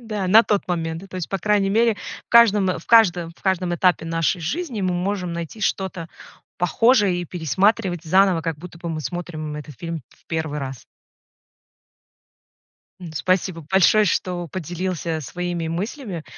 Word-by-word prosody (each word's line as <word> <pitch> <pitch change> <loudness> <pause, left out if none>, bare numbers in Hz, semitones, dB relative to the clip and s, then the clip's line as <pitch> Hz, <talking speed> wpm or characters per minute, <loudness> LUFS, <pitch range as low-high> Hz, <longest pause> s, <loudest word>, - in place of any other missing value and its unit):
Да, 215 -5 -3
на 215 +5 +8
тот 205 -3 0
момент. 165 -1 -2
Ну, 195 - -12
то 185 - -8
есть, 180 - -4
по 195 - -2
крайней 200 +1 +2
мере, 230 +2 +3 0.3
в - - -68
каждом 210 -6 +5
в 165 - -15
каждом 180 -7 +4
в - - -24
каждом 185 -2 0
этапе 180 -1 +2
нашей 165 +2 0
жизни 255 - -3
мы 185 -1 0
можем 180 0 -2
найти 170 +5 -6
что-то 190 -4 -2 0.5
похожее 205 +2 +3
и 175 - -4
пересматривать 180 +2 0
заново, 185 +1 +4
как 165 -2 -2
будто 170 +1 -11
бы 170 - -6
мы 160 -1 -3
смотрим 155 0 -5
этот 150 -3 -9
фильм 165 -3 -5
в - - -27
1 160 -2 -3
раз. 135 -3 -6 2.2
Ну, 175 -3 -8
спасибо 185 +1 0
большое, 195 +3 +5
что 175 -2 -1
поделился 175 -1 -3
своими 175 +2 -4
мыслями. 185 - -4
180 Hz, 160 wpm, -22 LUFS, 165-195 Hz, 2.2 s, на